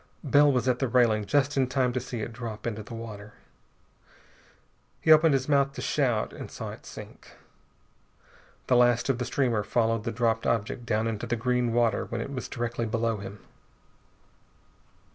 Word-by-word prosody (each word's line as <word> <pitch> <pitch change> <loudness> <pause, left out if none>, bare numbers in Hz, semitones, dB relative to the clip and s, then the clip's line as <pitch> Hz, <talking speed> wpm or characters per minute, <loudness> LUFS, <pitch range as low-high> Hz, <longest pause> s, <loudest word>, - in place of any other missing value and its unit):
Bell 145 0 +5
was 125 -2 0
at 125 -1 +2
the 135 - +1
railing 115 -4 +3
just 140 +6 +1
in 130 -1 +3
time 130 -1 0
to 130 - 0
see 125 -2 -6
it 115 - -5
drop 115 -2 -7
into 110 -2 -3
the 110 +2 -9
water. 105 -2 -9 1.6
He 160 - +3
opened 155 -1 +6
his 130 -1 -1
mouth 140 -1 +2
to - - -6
shout, 125 -7 0
and - - -8
saw - - -6
it - - -12
sink. - - -11 1.3
The 125 - +3
last 120 +1 +3
of 130 -2 +1
the 125 - -1
streamer 120 -3 +1
followed 115 0 0
the 115 - -2
dropped 115 -1 0
object 115 +2 -1
down 110 -1 +1
into 110 -2 -3
the 120 - 0
green 125 0 0
water 120 -1 +1
when 115 - -4
it 140 +4 -5
was 125 - -4
directly 120 -1 -3
below 115 0 0
him. 100 0 -9
120 Hz, 180 wpm, -27 LUFS, 115-130 Hz, 1.6 s, opened